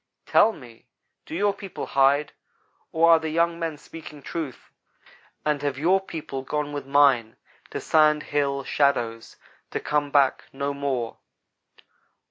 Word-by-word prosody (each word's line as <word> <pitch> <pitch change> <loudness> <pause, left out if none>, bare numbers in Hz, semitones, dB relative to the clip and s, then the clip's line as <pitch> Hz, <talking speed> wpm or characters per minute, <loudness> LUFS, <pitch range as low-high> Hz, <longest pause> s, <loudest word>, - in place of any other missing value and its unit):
Tell 220 - +5
me, 120 - -15 0.4
do - - -6
your 200 +3 +2
people 195 -2 -7
hide. 140 +2 +3 0.6
or 165 +1 +5
are 165 - +7
the 160 0 -3
young 170 +1 +1
men 165 -3 -3
speaking 150 -1 -11
truth, 155 -5 -6 0.7
and 150 -2 +1
have 145 -2 -2
your 180 +6 +3
people 155 -7 -6
gone 145 +2 -3
with 145 -2 -5
mine 135 -5 +4 0.3
to - - -4
Sand 155 -1 +3
Hill 140 -1 -1
shadows 120 -6 0 0.3
to - - -3
come 145 -1 -1
back 140 -2 +2
no 140 +1 -3
more?" 135 -5 -3
145 Hz, 140 wpm, -25 LUFS, 140-160 Hz, 0.7 s, are